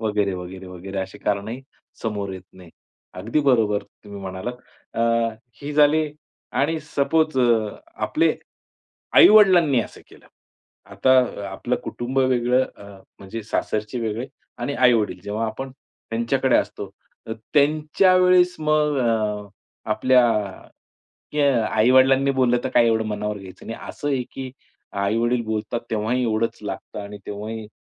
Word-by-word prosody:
वगैरे-वगैरे-वगैरे, 95 -2 -3
अशी 95 +2 -5
कारणंही 105 +5 -2 0.4
समोर 100 -3 -3
येत 95 -1 -8
नाही. 90 -3 -15 0.4
अगदी 115 +11 -1
बरोबर 110 -7 +2
तुम्ही 100 -1 -13
म्हणालात. 95 +6 -5 0.4
अ, - - -2 0.6
ही 145 - -4
झाली 150 +1 +4 0.5
आणि 160 +3 +1
सपोज 150 0 0
अ, 115 -4 +3 0.3
आपले, - - +2 0.8
आई-वडिलांनी 180 - +7
असं - - -8
केलं. - - -18 0.7
आता 130 - +1 0.4
आपलं 120 +6 -2
कुटुंब 130 +3 -3
वेगळं, 125 0 +2
अ, - - -14 0.4
म्हणजे 100 +3 -7
सासरचे 110 +2 -2
वेगळे 115 +3 -3 0.3
आणि 140 - -3
आई-वडील 115 -6 +2
जेव्हा 110 +2 -2
आपण 130 +4 -5
त्यांच्याकडे 130 0 -1
असतो, 100 -1 -3 0.6
त्यांच्यावेळेस 180 +5 +4
मग 150 -2 +2
अ, 105 -4 0 0.4
आपल्या 125 +2 +4 1.1
क्या 140 -6 +2
आई-वडिलांनी 130 +4 +4
बोललं, 125 -2 +3
तर - - -1
काय 120 - +4
एवढं 110 -1 +1
मनावर 105 0 -3
घ्यायचं 95 -1 -12
नाही. 115 - -5
असं 145 - -5
आहे 130 -3 0
की 130 -1 -7 0.5
आई-वडील 115 +4 +1
बोलतात 110 +1 -2
तेव्हाही 115 +4 0
एवढंच 115 0 0
लागतं - - -6
आणि 100 +1 -8
तेव्हाही 105 +2 -6
115 Hz, 125 wpm, -22 LUFS, 105-135 Hz, 1.1 s, आई-वडिलांनी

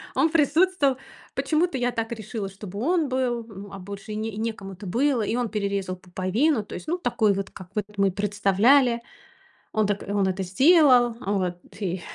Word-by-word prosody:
он 320 - +3
присутствовал. 310 -2 +3 0.4
Почему-то 315 -2 +1
я 245 0 0
так 225 0 -3
решила, 215 -2 -5
чтобы 200 0 -8
он 325 +3 +1
был, 245 -3 -1
м, 200 0 -10
а 195 - -7
больше 200 +3 -8
и - - -4
не 215 -1 -3
некому 220 -4 -4
это 185 +1 -9
было. 250 +4 +1
И 220 +2 -1
он 245 -3 -1
перерезал 200 -3 -2
пуповину, 195 - 0
то - - -10
есть, - - -8
ну, 350 +3 0
такой 220 - +1
вот, 195 0 -4
как 185 -2 -11
вот 210 -2 0
мы 195 -1 +3
представляли, 210 +6 +3 0.7
он 215 -1 +2
так 205 -1 -1
он 200 -1 +1
это 190 +1 -1
сделал, 250 - +5
вот 185 -5 -1 0.2
и, 180 -2 -2
215 Hz, 185 wpm, -25 LUFS, 195-255 Hz, 0.7 s, сделал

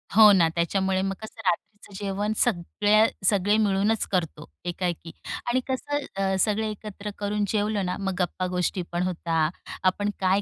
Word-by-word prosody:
हो 215 -1 +9
ना. 175 -4 +5
त्याच्यामुळे 190 +2 +1
मग 195 0 -1
कसं 220 +1 -10
रात्रीचं 205 +3 -2
जेवण 205 +2 -1
सगळ्या 210 +1 +3 0.2
सगळे 205 +1 +3
मिळूनच 210 +1 +2
करतो 165 -4 -2 0.2
एका-एकी 175 -1 -3 0.4
आणि 255 +2 +3
कसं 290 +2 -1 0.2
अ, 195 -1 +1
सगळे 215 +2 +1
एकत्र 210 0 -7
करून 205 0 -1
जेवलं 205 -1 0
ना, 180 - -2
मग 195 -1 -1
गप्पा-गोष्टी 180 0 -1
पण 175 +1 0
होतात. 165 -2 0 0.3
आपण 205 +2 +2
काय 190 +1 +3
195 Hz, 150 wpm, -26 LUFS, 180-210 Hz, 0.4 s, हो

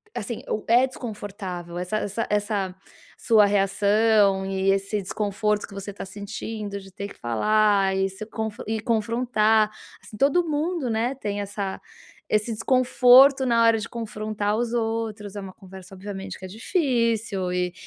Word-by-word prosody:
assim, 225 +2 -4
o 210 - -2
é 240 +3 +5
desconfortável 200 -8 -7
essa 180 +4 -2
essa 205 +3 -3
essa 205 -3 -1 0.4
sua 215 -2 +5
reação 205 0 +3
e 195 0 +1
esse 195 +2 -1
desconforto 210 +2 -1
que - - -14
você 200 +1 -6
está 200 - -8
sentindo 205 +1 -6
de 195 - -14
ter 200 +2 -6
que - - -14
falar 200 - +3
e 190 0 +1
se 190 +3 -8
conf 220 -1 -5
e 220 -1 -2
confrontar, 220 -1 +2 0.3
assim, 210 - -12
todo 285 +9 +3
mundo, 310 -2 -1
né, 230 +3 0
tem 205 -5 -4
essa 200 -1 -4 0.5
esse 215 +2 +1
desconforto 255 +3 +5
na 235 -2 +3
hora 230 -1 +5
de 220 +1 -5
confrontar 215 -2 -3
os 235 0 -1
outros. 225 -3 -2
É 205 - -4
uma 195 -1 -8
conversa, 190 0 -13
obviamente, 195 0 -7
que 185 - -8
é - - -6
difícil 225 - 0
e 180 -1 -1
210 Hz, 160 wpm, -24 LUFS, 195-230 Hz, 0.5 s, é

